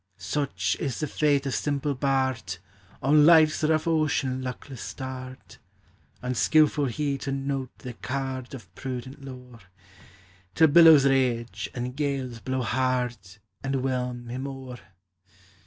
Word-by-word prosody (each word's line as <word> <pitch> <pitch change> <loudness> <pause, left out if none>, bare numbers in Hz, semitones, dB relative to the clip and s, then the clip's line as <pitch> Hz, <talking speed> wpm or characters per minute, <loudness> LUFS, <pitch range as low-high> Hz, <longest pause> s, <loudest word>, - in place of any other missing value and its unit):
Such 145 -2 -1
is 130 -5 -3
the 155 - 0
fate 145 -1 +1
of 135 - -2
simple 145 +5 -1
bard, 130 -7 -1 0.5
On 150 +3 +5
life's 155 -1 +6
rough 155 0 +2
ocean 150 -5 +1
luckless 130 0 -7
starred! 130 -1 -8 0.7
Unskilful 145 +4 +3
he 140 +2 -2
to 135 - -4
note 135 -1 -2
the 125 -2 -8
card 130 +1 -4
Of 95 -9 -13
prudent 130 +3 -7
lore, 125 -3 -10 1.0
Till 160 -1 +6
billows 160 -2 +8
rage, 125 -4 +1
and 125 +1 -4
gales 135 -5 -2
blow 130 +1 -2
hard, 125 +1 0 0.5
And 135 -1 -1
whelm 125 -2 -2
him 130 +3 -4
o'er! 130 -2 -8
130 Hz, 125 wpm, -26 LUFS, 125-140 Hz, 1.0 s, billows